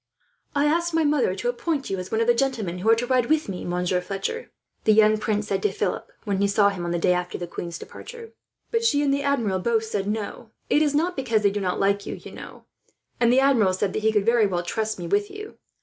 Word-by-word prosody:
"I 285 0 +3
asked 340 +2 +1
my 325 - +3
mother 290 -10 +2
to 235 +5 -2
appoint 275 +3 -2
you 190 - -1
as 185 - -7
one 220 - +1
of - - +2
the 240 - +5
gentlemen 235 -9 -1
who 210 +5 0
are 225 - +7
to 235 +2 -2
ride 250 -1 +2
with 310 0 +1
me, 185 -3 -5
Monsieur 180 +1 -1
Fletcher," 195 - -4 0.3
the 215 - +5
young 215 0 +5
prince 210 -1 -1
said 195 -2 -1
to 210 - +1
Philip, 195 -1 -3
when 200 -2 -1
he 200 - +3
saw 200 0 +4
him 180 -3 -5
on - - -2
the 175 - 0
day 180 +1 +3
after 180 0 -3
the 175 - -4
queen's 170 0 -6
departure; 465 - -10 0.4
"but 460 0 +1
she 290 -10 +3
and 275 -1 +2
the 280 - 0
Admiral 240 -10 0
both 225 +3 +1
said 205 -3 -3
no. 215 +1 -4 0.2
It 295 - +4
is 295 -2 +2
not 345 +4 +1
because 230 -6 0
they 200 - +4
do 205 0 -3
not 180 -2 -1
like 200 0 +1
you, - - -4
you - - -11
know; - - -11 0.5
and 235 -1 +4
the 260 +2 +5
Admiral 235 -9 +4
said 190 +1 -1
that 215 - -2
he 220 +1 +3
could 210 -2 +1
very 230 -2 +4
well 175 -2 -2
trust 220 +4 -2
me 175 - -6
with 205 +4 +1
you. 420 +1 -10
215 Hz, 260 wpm, -24 LUFS, 195-275 Hz, 0.5 s, are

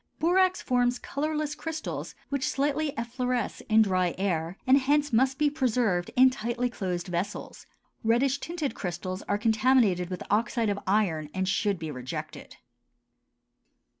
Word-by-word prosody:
Borax 370 +3 +2
forms 245 -1 +2
colorless 300 +2 -2
crystals 320 0 -5
which 280 -2 -1
slightly 290 +2 0
effloresce 245 0 -2
in 220 0 +6
dry 185 -3 +1
air 175 -2 -1
and 265 +2 +6
hence 290 +1 +1
must 260 +3 +3
be 300 0 +3
preserved 245 - +1
in 260 +1 +7
tightly 245 0 -2
closed 180 -6 -3
vessels. 180 +1 -4 0.4
Reddish 250 +5 +2
tinted 320 -7 -3
crystals 185 +1 -4
are 205 - +2
contaminated 220 -5 +3
with 180 -2 -5
oxide 225 +1 +1
of 200 0 -1
iron 180 -7 +1
and 190 0 0
should 200 +1 +1
be 160 -2 -5
rejected. 125 -2 -7
235 Hz, 135 wpm, -28 LUFS, 190-275 Hz, 0.4 s, in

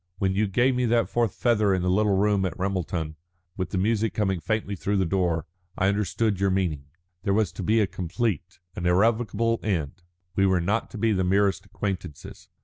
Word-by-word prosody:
When 95 -1 +1
you 105 +2 +1
gave 120 +7 +2
me 125 -1 +1
that 115 0 +2
fourth 115 -4 0
feather 105 -5 +2
in 90 - -1
the - - 0
little 100 0 +2
room 100 -1 +2
at 95 -4 -2
Ramelton, 90 -4 -2 0.4
with 95 -2 -3
the - - -3
music 110 +1 +1
coming 95 -4 0
faintly 110 +1 -2
through 100 +2 -1
the 95 - +2
door, 85 -2 0 0.3
I 95 - +3
understood 100 0 0
your 100 0 +2
meaning. 90 -7 -1 0.4
There 100 +2 +1
was 105 -5 +1
to 95 - -7
be 110 +5 +2
a - - +4
complete, 95 +1 -3 0.2
an 90 - -2
irrevocable 115 +4 +2
end. 85 -4 -2 0.3
We 95 0 +3
were 95 -1 +3
not 100 +7 -1
to - - -8
be 110 +1 +2
the 95 -3 +1
merest 100 +1 +1
acquaintances. 95 -7 -6
95 Hz, 200 wpm, -26 LUFS, 90-110 Hz, 0.4 s, a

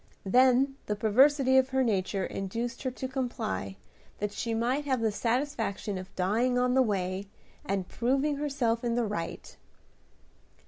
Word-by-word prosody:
Then 260 +5 +4
the 210 - 0
perversity 260 +5 +4
of 260 0 +1
her 265 0 +2
nature 195 -4 0
induced 230 +5 -4
her 260 - -1
to 260 +1 -5
comply, 240 - -3 0.4
that 210 0 -2
she 225 +2 -3
might 250 +6 0
have 260 -3 +1
the 225 -1 +1
satisfaction 225 -4 -1
of 185 - -11
dying 225 +7 +1
on 250 0 +2
the 265 - +5
way, 195 -4 -1 0.4
and 195 -2 -2
proving 275 +4 0
herself 270 -6 0
in 235 -1 0
the 240 -1 +1
right. 185 -6 -5
235 Hz, 150 wpm, -29 LUFS, 200-260 Hz, 0.4 s, the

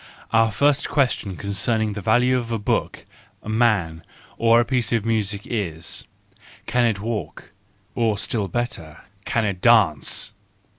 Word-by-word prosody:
Our 115 0 +4
first 145 +6 +1
question 125 - 0
concerning 105 +2 0
the 105 - -6
value 125 +6 +3
of 120 -2 -2
a 115 - 0
book, 105 - -2 0.4
a - - -8
man, 105 -8 +1 0.4
or 115 0 +5
a 120 - +2
piece 120 -3 -1
of 115 -3 0
music 105 -3 -1
is: 85 -9 -3 0.6
Can 120 +1 +1
it 110 -4 0
walk? 105 -6 -5 0.4
or 115 -3 0
still 105 0 -2
better: 85 -7 -4 0.2
Can 115 -2 0
it 95 -3 -3
dance? 105 - +3
110 Hz, 145 wpm, -22 LUFS, 100-120 Hz, 0.6 s, or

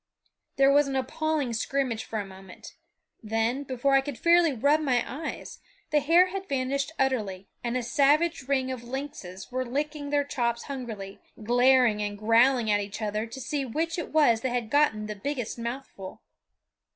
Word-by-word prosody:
There 275 0 +5
was 290 0 +4
an 270 - -3
appalling 295 0 -1
scrimmage 250 0 -1
for 220 - -4
a 205 - -4
moment; 190 -1 -12 0.5
then, 225 +4 -1
before 270 0 -1
I 270 - +6
could 275 -2 -6
fairly 340 -1 +4
rub 285 +5 +2
my 255 -6 +1
eyes, 310 +5 -6 0.3
the 300 - +4
hare 335 +6 +4
had 385 +1 -6
vanished 275 +2 -1
utterly, 210 -8 -1
and 240 +1 -1
a 250 - -2
savage 290 +4 +2
ring 265 -2 0
of 250 -2 -6
lynxes 240 -7 -7
were 255 +1 -1
licking 290 +3 -3
their 290 0 +2
chops 235 -4 -2
hungrily, 225 -8 -7 0.2
glaring 245 -1 +4
and 205 0 -3
growling 230 +2 +3
at 205 0 +2
each 200 +1 -6
other 215 +1 -2
to 250 +4 -9
see 275 +2 -2
which 325 +7 -2
it 335 - -6
was 265 -8 +4
that 260 - -1
had 240 -2 -3
gotten 285 -8 +2
the 210 - -4
biggest 245 +1 -4
mouthful. 235 -5 -7
255 Hz, 175 wpm, -27 LUFS, 225-285 Hz, 0.5 s, I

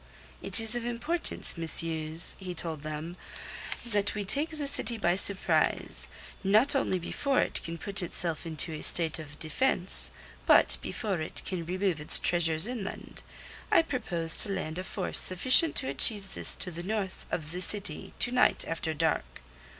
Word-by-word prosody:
"It - - +6
is 225 +1 +1
of 240 - -3
importance, 240 - -1
messieurs," 160 0 -1
he 185 -2 -6
told 160 -3 -3
them, 155 +3 -6 0.7
"that 205 -3 0
we 205 -1 -3
take 285 - +2
the 305 -2 -3
city 245 -4 0
by 175 -4 +1
surprise, 195 0 0 0.4
not 215 +9 +4
only 225 -8 +1
before 265 +10 -1
it - - -1
can 165 0 -6
put 200 +3 0
itself 170 -2 -1
into 160 0 -1
a 155 - -6
state 165 -2 +2
of 150 -1 -10
defence; 180 +3 -1 0.4
but - - +6
before 195 -7 -3
it 155 - -4
can 170 -3 -5
remove 185 -3 -1
its 150 - +4
treasures 165 -1 +2
inland. 225 -4 -6 0.5
I - - +5
propose 175 - +3
to - - -1
land 165 -3 -4
a - - -4
force 190 -1 -1
sufficient 255 - +4
to 130 - +1
achieve 195 - +3
this - - -1
to 180 - -2
the 170 0 -6
north 195 0 -3
of 155 -2 -4
the 180 +1 -3
city 195 -4 -2
to 245 - +1
night 250 0 +2
after 165 -1 -2
dark." 160 - -2
185 Hz, 165 wpm, -29 LUFS, 165-220 Hz, 0.7 s, It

